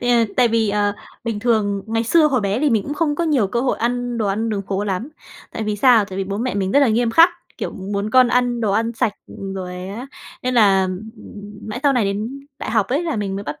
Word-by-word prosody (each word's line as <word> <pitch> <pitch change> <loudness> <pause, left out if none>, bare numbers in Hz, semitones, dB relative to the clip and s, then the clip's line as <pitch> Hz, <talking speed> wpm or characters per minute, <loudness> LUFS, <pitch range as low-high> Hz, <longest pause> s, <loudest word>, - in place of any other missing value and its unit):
ờ, 245 - -2 0.3
tại 245 -2 +5
vì, 225 -1 +1
ờ, 205 0 +1 0.3
bình 220 -3 -3
thường 205 -4 +1
ngày 225 +1 -1
xưa 310 +6 +4
hồi 255 -5 +1
bé 200 +2 0
thì 295 -2 +2
mình 220 -3 +2
cũng 290 - -5
không 295 -1 0
có 340 - -1
nhiều 280 -10 +2
cơ 235 +5 -1
hội 255 0 0
ăn 245 0 -1
đồ 215 - 0
ăn 210 +3 -1
đường 205 -3 -2
phố 195 +1 -1
lắm, 200 +5 -2 0.4
tại - - -4
vì 210 -1 -2
sao? 230 -1 +5
Tại 190 -1 -7
vì 195 - -1
bố 200 +2 -4
mẹ 250 0 -2
mình 195 -1 -1
rất 285 - +5
là 275 - +4
nghiêm 230 +1 +1
khắc, 330 +8 +7 0.3
kiểu, - - -4
muốn 200 +2 -4
con 255 +1 +5
ăn 245 -1 +1
đồ 215 -3 +1
ăn 225 +3 0
sạch, 230 -1 0
ừm, 195 -1 -7
rồi 180 -1 -6
á 225 +7 -6 0.4
nên 255 0 -1
là 195 -5 +4 0.8
mãi 210 - -5
sau 285 -2 +4
này 245 -5 +2
đến 215 +7 -3 0.2
đại - - -5
học 215 -3 +2
ấy 285 +7 0
là 325 -8 -2
mình 195 -2 -2
mới 200 - -4
bắt 150 -6 -6
225 Hz, 260 wpm, -20 LUFS, 200-245 Hz, 0.8 s, khắc